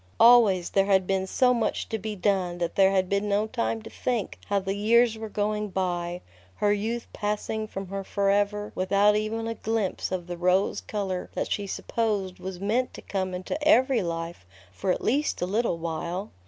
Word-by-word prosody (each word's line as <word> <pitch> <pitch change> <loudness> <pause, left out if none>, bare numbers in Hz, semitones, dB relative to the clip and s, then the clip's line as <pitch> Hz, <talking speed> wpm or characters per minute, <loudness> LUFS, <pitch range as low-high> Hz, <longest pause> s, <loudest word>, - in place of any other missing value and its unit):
Always 225 -7 +6
there 195 0 +3
had 190 -2 +4
been 190 0 0
so 250 +5 +3
much 235 -2 -1
to 220 - -2
be 215 +1 -4
done 185 -2 0
that 170 -1 -2
there 190 -1 +5
had 190 -1 +1
been 200 +2 0
no 205 +1 +2
time 225 -1 -2
to 225 - -9
think 240 -6 -2
how 200 - +1
the 195 0 -1
years 225 +3 +3
were 220 0 -6
going 210 0 -1
by, 175 -2 -2 0.3
her 205 0 +2
youth 225 +3 -2
passing 210 +1 -2
from 195 -3 -6
her 195 0 -4
forever 205 +1 0
without 200 +3 +3
even 220 +2 -1
a 230 - -2
glimpse 220 -4 -2
of 185 -2 -2
the 175 0 -6
rose 180 +3 +2
color 190 -4 -3
that - - -2
she 200 -1 -1
supposed 200 -3 -2
was 185 -1 -6
meant 225 +6 0
to - - -10
come 185 -2 -2
into 185 +11 -4
every 265 -4 +4
life 165 - -4 0.3
for 140 - -4
at - - -2
least 290 +5 +1
a - - 0
little 205 -1 0
while. 170 +4 -4
200 Hz, 195 wpm, -26 LUFS, 185-220 Hz, 0.3 s, Always